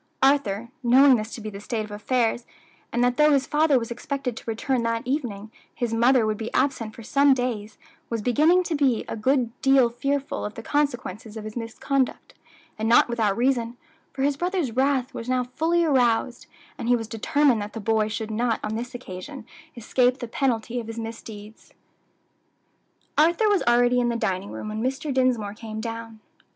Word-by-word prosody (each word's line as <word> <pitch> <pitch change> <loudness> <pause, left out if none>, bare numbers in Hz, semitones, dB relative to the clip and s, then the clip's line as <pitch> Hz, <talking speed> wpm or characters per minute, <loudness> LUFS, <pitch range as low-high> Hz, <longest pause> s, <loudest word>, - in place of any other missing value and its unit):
Arthur, 235 -6 +2
knowing 260 +2 +6
this 215 +1 -5
to - - -8
be 215 0 -6
the 200 - -8
state 220 0 -3
of 210 - -13
affairs, 235 +2 -1 0.4
and 240 +1 +1
that 245 0 +1
though 300 0 +5
his 275 -1 +2
father 300 -2 +3
was 230 -1 -3
expected 255 0 -4
to - - -9
return 235 +3 -1
that 230 0 -1
evening, 235 -6 -3 0.2
his 235 -2 -2
mother 240 +1 +4
would 215 -1 -1
be 225 0 -4
absent 260 -5 0
for 230 - -10
some 280 +3 +4
days, 225 -4 -3 0.3
was 230 -2 -3
beginning 310 - +4
to 345 - -3
be 275 -6 +1
a - - -4
good 245 +1 +1
deal 270 -3 +4
fearful 275 +3 -2
of 210 - -5
the 225 - -8
consequences 240 -7 -2
of 215 - -6
his 215 0 -8
misconduct, 250 +3 -2 0.5
and 220 +1 0
not 235 - +5
without 220 -4 0
reason, 240 -1 0 0.3
for 270 - -3
his 280 0 +1
brother's 350 -5 -1
wrath 265 +1 +1
was 230 - -6
now 255 0 +1
fully 330 +7 0
aroused, 250 -3 +1 0.3
and - - -4
he 245 - +5
was 225 -2 -4
determined 240 +2 +2
that 205 +1 -6
the 225 - -5
boy 220 0 +1
should 215 +1 -4
not 230 +1 0
on 215 - -3
this 245 +3 -5
occasion 240 +3 -8 0.3
escape 250 +2 +2
the 240 - -6
penalty 245 -1 -1
of 230 - -7
his 225 0 -7
misdeeds. 225 -1 -9 1.4
Arthur 340 +8 +4
was 410 -2 +3
already 245 +1 +4
in 240 -1 +1
the 235 - -1
dining 200 -3 -2
room 215 - -6
when 215 +1 -4
Mr. 270 +3 -2
Dinsmore 250 -6 +1
came 220 0 -7
down. 225 0 -6
240 Hz, 190 wpm, -24 LUFS, 220-270 Hz, 1.4 s, knowing